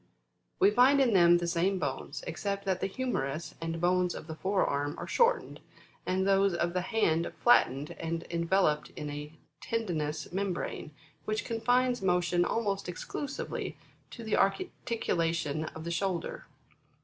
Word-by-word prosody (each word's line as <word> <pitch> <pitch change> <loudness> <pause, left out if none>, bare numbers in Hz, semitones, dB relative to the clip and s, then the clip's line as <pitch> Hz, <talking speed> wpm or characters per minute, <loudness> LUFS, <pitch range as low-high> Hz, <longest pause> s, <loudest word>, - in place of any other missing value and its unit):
We 395 +2 +6
find 270 0 +5
in 255 -5 +4
them 175 -2 +6
the 175 - -2
same 175 +3 +1
bones, 140 -6 -4
except 200 +4 -3
that 190 -1 0
the - - +1
humerus 170 - -3
and 165 0 -3
bones 180 +1 +2
of - - -7
the 160 - -6
fore 190 +5 +1
arm 145 +2 -1
are - - -5
shortened, 475 0 +1 0.5
and 190 +1 +1
those 195 -1 +3
of 170 0 0
the 180 - 0
hand 175 -5 +1
flattened 145 - +4
and 165 0 -3
enveloped 170 -2 +1
in 150 -1 -5
a 150 +1 -7 0.3
tendinous 160 -10 -2
membrane, 185 -4 -3 0.4
which 215 0 -2
confines 245 +2 +1
motion 180 -1 +2
almost 200 -5 -1
exclusively 275 - -5 0.3
to 235 - -9
the 220 - 0
articulation 165 - 0
of 160 0 -8
the 170 - -4
shoulder. 175 -1 -2
180 Hz, 150 wpm, -30 LUFS, 165-210 Hz, 0.5 s, We